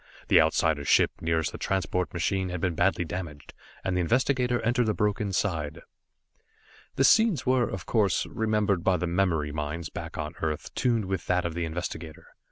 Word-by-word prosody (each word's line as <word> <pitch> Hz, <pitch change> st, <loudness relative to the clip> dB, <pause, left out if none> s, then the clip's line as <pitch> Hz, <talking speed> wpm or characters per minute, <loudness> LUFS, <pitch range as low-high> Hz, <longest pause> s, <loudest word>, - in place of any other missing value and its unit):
The -, -, +7 dB
Outsider's 75 Hz, -3 st, +1 dB
ship -, -, +4 dB
nearest 80 Hz, -1 st, 0 dB
the -, -, -8 dB
transport 90 Hz, -1 st, -1 dB
machine 95 Hz, +2 st, -1 dB
had 90 Hz, 0 st, -4 dB
been 90 Hz, +1 st, 0 dB
badly 90 Hz, +1 st, +1 dB
damaged, 80 Hz, -4 st, -7 dB, 0.3 s
and 95 Hz, -, -1 dB
the 90 Hz, -, +2 dB
investigator 125 Hz, +4 st, +1 dB
entered 120 Hz, 0 st, +1 dB
the 110 Hz, -, +1 dB
broken 105 Hz, -1 st, 0 dB
side. 85 Hz, -4 st, -2 dB, 1.1 s
The 135 Hz, -, +2 dB
scenes 220 Hz, +2 st, +4 dB
were, 130 Hz, -2 st, +2 dB
of 95 Hz, -4 st, -6 dB
course, 105 Hz, -6 st, +1 dB
remembered 105 Hz, -5 st, 0 dB
by 95 Hz, -1 st, +3 dB
the 90 Hz, -, -2 dB
memory 85 Hz, -4 st, 0 dB
minds 75 Hz, +2 st, -4 dB
back -, -, -7 dB
on -, -, -4 dB
Earth 75 Hz, -2 st, -3 dB
tuned 115 Hz, -4 st, +1 dB
with 95 Hz, -1 st, -3 dB
that 90 Hz, -1 st, +1 dB
of 85 Hz, -, -2 dB
the 85 Hz, 0 st, -2 dB
investigator. 80 Hz, -1 st, -6 dB
90 Hz, 175 wpm, -27 LUFS, 80-105 Hz, 1.1 s, The